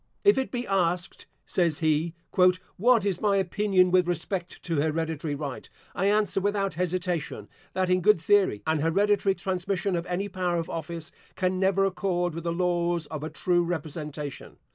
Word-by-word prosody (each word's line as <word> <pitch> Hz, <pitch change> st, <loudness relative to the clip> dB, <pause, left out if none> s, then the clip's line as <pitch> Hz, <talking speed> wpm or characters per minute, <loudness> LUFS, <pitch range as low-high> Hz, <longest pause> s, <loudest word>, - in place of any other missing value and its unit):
"If 405 Hz, -8 st, +5 dB
it 265 Hz, -, -2 dB
be 245 Hz, -1 st, -3 dB
asked," 180 Hz, -2 st, -1 dB, 0.2 s
says 170 Hz, -5 st, +1 dB
he, 160 Hz, +1 st, +1 dB, 0.7 s
"what 235 Hz, -3 st, +4 dB
is 190 Hz, -3 st, -1 dB
my 205 Hz, -2 st, +3 dB
opinion 190 Hz, -1 st, +2 dB
with 180 Hz, -1 st, +4 dB
respect 175 Hz, +1 st, -3 dB
to 165 Hz, -3 st, -2 dB
hereditary 155 Hz, 0 st, -1 dB
right, 140 Hz, -2 st, -6 dB, 0.2 s
I 195 Hz, -, 0 dB
answer 205 Hz, -1 st, +2 dB
without 200 Hz, 0 st, 0 dB
hesitation, 175 Hz, -, -2 dB, 0.3 s
That 185 Hz, -1 st, 0 dB
in 180 Hz, 0 st, +3 dB
good 210 Hz, 0 st, +5 dB
theory, 190 Hz, -, +2 dB
an 160 Hz, -1 st, +1 dB
hereditary 195 Hz, +5 st, +2 dB
transmission 190 Hz, 0 st, -1 dB
of 170 Hz, +1 st, -3 dB
any 180 Hz, +3 st, -2 dB
power 180 Hz, -2 st, -1 dB
of 165 Hz, -1 st, -3 dB
office, 165 Hz, 0 st, -5 dB, 0.2 s
can 185 Hz, -1 st, 0 dB
never 195 Hz, 0 st, +3 dB
accord 180 Hz, -3 st, -1 dB
with 165 Hz, +1 st, -6 dB
the 170 Hz, -, 0 dB
laws 175 Hz, -1 st, 0 dB
of 155 Hz, -2 st, -4 dB
a 155 Hz, -, -3 dB
true 175 Hz, 0 st, +1 dB
representation. 150 Hz, -5 st, -5 dB
180 Hz, 165 wpm, -27 LUFS, 165-195 Hz, 0.7 s, If